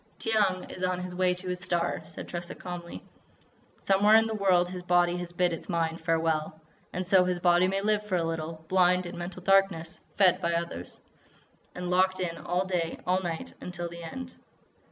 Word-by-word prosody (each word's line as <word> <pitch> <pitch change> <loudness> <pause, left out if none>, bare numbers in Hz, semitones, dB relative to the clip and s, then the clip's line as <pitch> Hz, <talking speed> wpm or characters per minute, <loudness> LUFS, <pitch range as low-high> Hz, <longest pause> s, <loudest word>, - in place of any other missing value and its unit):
"Tiyang 205 -5 0
is 185 - -10
on 180 0 0
his 180 0 -6
way 180 0 +2
to 180 +1 -10
his 180 0 -2
star," 175 -1 -1
said 160 0 -8
Tressa 175 0 -5
calmly. 175 -1 -7 0.7
"Somewhere 205 +2 +4
in 225 0 +6
the 225 - -2
world 185 -4 +3
his 180 0 -6
body 175 0 +3
has 175 -1 -5
bid 175 0 +1
its 165 - -7
mind 165 -1 -1
farewell.... 160 -1 0 0.3
And 180 +1 -3
so 185 0 +5
his 180 -1 -1
body 175 +1 +4
may 195 +1 0
live 210 0 +1
for 190 - 0
a 170 - +1
little, 160 0 -4
blind, 180 0 +3
in 175 - -6
mental 175 +1 -7
darkness, 195 -4 +2 0.2
fed 185 -2 +4
by 170 -1 0
others, 170 - -4 0.7
and 180 0 -4
locked 185 +1 +3
in 175 -2 -2
all 180 +2 -1
day, 175 -3 -1
all 185 +1 +2
night, 170 -3 -4
until 175 -1 -5
the 170 0 -9
end." 255 +10 -7
180 Hz, 195 wpm, -28 LUFS, 170-185 Hz, 0.7 s, in